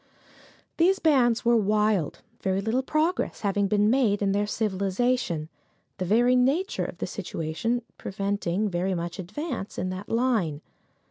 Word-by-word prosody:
These 370 +4 +4
bands 250 -9 +3
were 235 0 +5
wild, 210 -5 +1 0.2
very 190 -1 0
little 225 +6 0
progress 310 +6 -1
having 200 -1 +1
been 210 +1 +2
made 220 -4 +2
in 195 - +2
their 205 +1 +1
civilization, 200 -4 0 0.5
the 185 - -1
very 240 +6 +4
nature 280 +10 +1
of - - -7
the - - -3
situation 225 +10 -3 0.2
preventing 200 0 -1
very 185 0 -1
much 170 +2 -4
advance 210 - -5
in 185 - -2
that 185 +2 -7
line. 225 - +1
210 Hz, 140 wpm, -26 LUFS, 190-245 Hz, 0.5 s, were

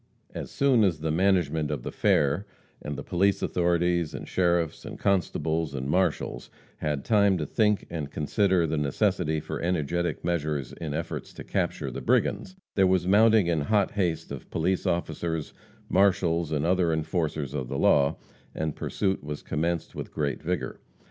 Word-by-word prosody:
As - - -5
soon 135 -5 +3
as 85 -7 +1
the 80 0 0
"management" 80 -4 +2
of 75 -5 -3
the - - -4
fair 75 +8 +2 0.3
and 75 0 -4
the - - -5
police 100 +3 +1
authorities, 85 -2 +1
and - - -7
sheriffs, 85 -3 +1
and - - -7
constables, 80 -5 0
and 65 0 -3
marshals 90 +6 0 0.3
had 75 -2 -2
time 100 -3 +4
to 75 - -2
think 105 +5 +1
and 80 -4 -4
consider 90 +3 +1
the 80 -1 -1
necessity 80 +2 +1
for - - -5
energetic 85 -1 -1
measures 75 -6 -1
in 75 -3 -5
efforts 85 +1 -4
to - - -8
capture - - -2
the - - -6
brigands, 185 - +1 0.2
there 95 -2 +4
was 90 -1 +2
mounting 110 +1 +5
in 85 -3 +1
hot 100 +5 +2
haste 90 -6 -1
of - - -7
police 90 +3 0
officers, 80 -1 -2 0.3
marshals 90 -4 +2
and 75 0 0
other 90 -1 +2
enforcers 80 -3 -1
of 65 -4 -3
the - - -3
law, 70 -1 +3 0.4
and 80 -2 -2
pursuit 95 -5 -1
was 75 0 -6
commenced 85 +2 -2
with - - -6
great 70 -3 -2
vigor. - - -3
85 Hz, 165 wpm, -27 LUFS, 75-95 Hz, 0.4 s, mounting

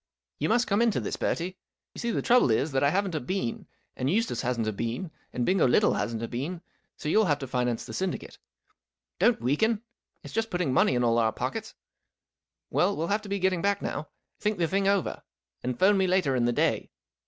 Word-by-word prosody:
You - - 0
must 240 +2 +3
come 200 +2 +1
into 230 -3 +2
this, - - -3
Bertie. 180 +3 -2 0.3
You - - -9
see, 235 - -2
the - - -1
trouble 245 - +5
is 135 +7 +1
that 135 -1 +1
I 140 - +5
haven't 195 +2 0
a 155 - 0
bean, 150 -3 -3 0.3
and 130 - -1
Eustace 225 +7 0
hasn't 120 -3 -1
a 110 - -1
bean, 115 - -3 0.2
and 125 - -1
Bingo 185 -6 +3
Little 125 - +4
hasn't 115 -1 -2
a - - -2
bean, 155 +10 -4 0.3
so - - -6
you'll 215 +8 +4
have 145 -5 +2
to 140 - -5
finance 125 -2 -1
the - - -8
syndicate. 190 -2 -4 0.8
Don't - - +4
weaken! 205 - +1 0.4
It's - - -10
just 225 0 0
putting 175 -7 0
money 130 - +4
in 125 - +1
all 115 0 +3
our 110 -1 +3
pockets. - - -4 1.0
Well, 195 +3 +3
we - - -4
'11 170 - -1
have 210 +1 +2
to 210 - -10
be 200 - 0
getting 185 -2 +1
back 200 +1 +1
now. 150 -5 -4 0.3
Think 210 0 0
the 170 -2 +1
thing 195 +3 +1
over, 200 -2 +1 0.4
and 125 -1 -3
'phone 195 +4 +4
me 190 - +3
later 180 -7 +2
in 120 -2 +2
the 120 - +2
day. - - 0
170 Hz, 220 wpm, -28 LUFS, 125-200 Hz, 1.0 s, trouble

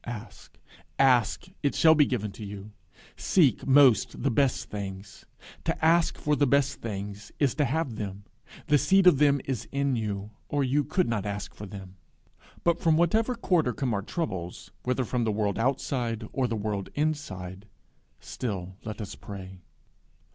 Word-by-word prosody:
Ask, 115 -3 -9 0.4
ask; 125 -1 +3 0.2
it 140 - 0
shall 160 -1 +6
be 150 -3 +4
given 105 -5 -2
you. 105 -1 -8 0.4
Seek 150 -10 +2
most 135 -4 +5
the 135 - +2
best 135 +1 +1
things; 100 -1 -7 0.4
to - - -1
ask 165 +1 +3
for 150 0 +1
the 145 -1 +2
best 140 0 +1
things 105 -1 -6
is 140 -5 +2
to 150 - +1
have 135 -4 -1
them; 100 -1 -5 0.4
the 150 -2 +4
seed 195 +4 +4
of 175 -7 +7
them 140 -2 +4
is 130 -4 -3
in 140 -1 0
you, 105 -2 -3 0.2
or 145 -1 +1
you 140 +3 +2
could 180 +6 0
not 105 -4 -1
ask 100 0 -5
for 105 - -9
them. 95 -1 -10 0.7
But 170 -1 +2
from 160 -2 +3
whatever 220 +9 +2
quarter 175 - +1
come 130 -3 -1
our 100 - 0
troubles, 95 - -5
whether 125 +1 0
from 125 +1 -1
the 110 - +1
world 105 0 -1
outside 120 -3 -1
or 130 -2 +1
the 115 - -2
world 100 -2 -3
inside, 105 -11 -3 0.5
still 95 -6 -5
let 110 +1 -6
us 105 - -6
pray. 95 -2 -9
120 Hz, 165 wpm, -27 LUFS, 100-145 Hz, 0.7 s, of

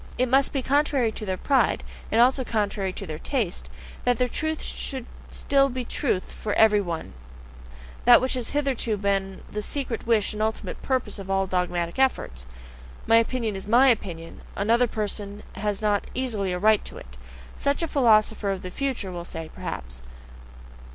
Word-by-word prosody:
It 255 - +2
must 270 +2 +4
be 270 -2 -2
contrary 275 -4 +2
to 215 -1 -7
their 185 -1 -1
pride, 260 -3 +2 0.3
and 225 - +3
also 260 +2 +5
contrary 205 -4 -1
to 195 - -7
their 155 -3 -6
taste, 225 - -2 0.3
that 245 -1 +2
their 250 - +2
truth 315 +5 -2
should 260 -3 -4 0.2
still 275 -1 +2
be 255 -1 -4
truth 230 -10 -1
for 210 - -4
every 210 -2 +5
one 170 - -5 0.9
that 240 0 +9
which 260 +1 -1
has 250 -3 -3
hitherto 270 -6 0
been 195 -1 -1
the 210 - -3
secret 255 -1 -3
wish 220 -4 +2
and 215 - -4
ultimate 220 0 -2
purpose 260 -5 -1
of 195 -1 -8
all 195 0 +2
dogmatic 180 0 -1
efforts. 65 - 0 0.6
"My 225 0 +6
opinion 230 -2 0
is 190 +1 -6
MY 250 +5 +6
opinion: 170 -8 -2
another 230 +4 +3
person 210 -1 -4
has 210 0 -2
not 205 -1 +1
easily 220 -7 -1
a 180 - -1
right 215 +2 +4
to - - -7
it" 65 -1 -12 0.4
such 280 +4 0
a - - 0
philosopher 220 -7 +3
of 195 -2 -2
the 180 - -6
future 255 -6 -2
will 175 -1 -5
say, 165 -2 -7
perhaps. 65 0 -6
215 Hz, 175 wpm, -25 LUFS, 195-255 Hz, 0.9 s, that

